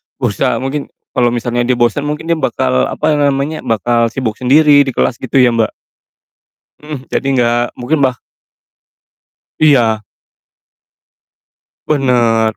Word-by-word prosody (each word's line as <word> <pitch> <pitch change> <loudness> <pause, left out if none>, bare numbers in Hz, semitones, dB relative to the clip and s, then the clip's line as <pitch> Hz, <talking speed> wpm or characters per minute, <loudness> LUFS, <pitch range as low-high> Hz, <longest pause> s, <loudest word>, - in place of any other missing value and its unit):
berusaha - - -1
mungkin, 140 +2 -3 0.2
kalo 125 -2 +1
misalnya 120 0 -1
dia 125 - +2
bosen 120 +5 0
mungkin 150 +1 -4
dia 165 -1 0
bakal, 65 - 0
apa 150 -1 0
namanya, 140 +2 0
bakal 115 +1 +1
sibuk 115 -2 -4
sendiri 145 +3 +5
di - - -1
kelas 120 - 0
gitu 130 - -7
ya 120 - +4
Mbak? 115 -1 0 1.1
Mhm. 150 -4 -8
Jadi - - -3
nggak 120 0 +2 0.2
mungkin 135 +6 -1
bah 130 -2 +1 1.4
Iya. 115 -8 +3 1.8
Benar, 120 -6 +1
125 Hz, 125 wpm, -14 LUFS, 120-145 Hz, 1.8 s, sendiri